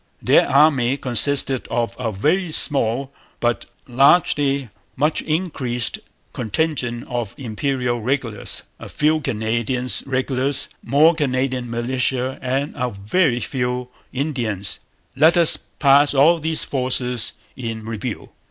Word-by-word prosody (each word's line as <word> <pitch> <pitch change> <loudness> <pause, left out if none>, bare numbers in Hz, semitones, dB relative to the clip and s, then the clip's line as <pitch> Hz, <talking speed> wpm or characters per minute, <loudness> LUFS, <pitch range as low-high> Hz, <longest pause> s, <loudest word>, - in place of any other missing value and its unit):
Their - - +3
army 135 -3 +3
consisted 130 +1 +3
of 120 -1 -2
a 115 -3 -2
very 160 - 0
small 135 -2 +2 0.3
but 120 0 -1 0.2
latterly 140 0 +2 0.3
much 150 +3 0
increased 140 -8 -2 0.3
contingent 125 -1 -2
of 120 -4 -4
Imperial 125 0 -2
regulars, 120 -3 -2 0.2
a - - -9
few 155 +1 +1
Canadian 115 +2 -2 0.2
regulars, 130 +1 -1
more 155 +4 +4
Canadian 130 -4 -2
militia, 125 +2 -1
and 135 +3 -2
a 125 0 -2
very 120 - 0
few 125 +1 -3 0.2
Indians. 120 - -3 0.4
Let 160 +5 +4
us 170 -2 +5
pass 140 0 +2
all 160 +5 +5
these 160 0 -1
forces 125 -3 0 0.2
in 115 -3 -6
review. 115 +1 -6
130 Hz, 115 wpm, -20 LUFS, 120-145 Hz, 0.4 s, us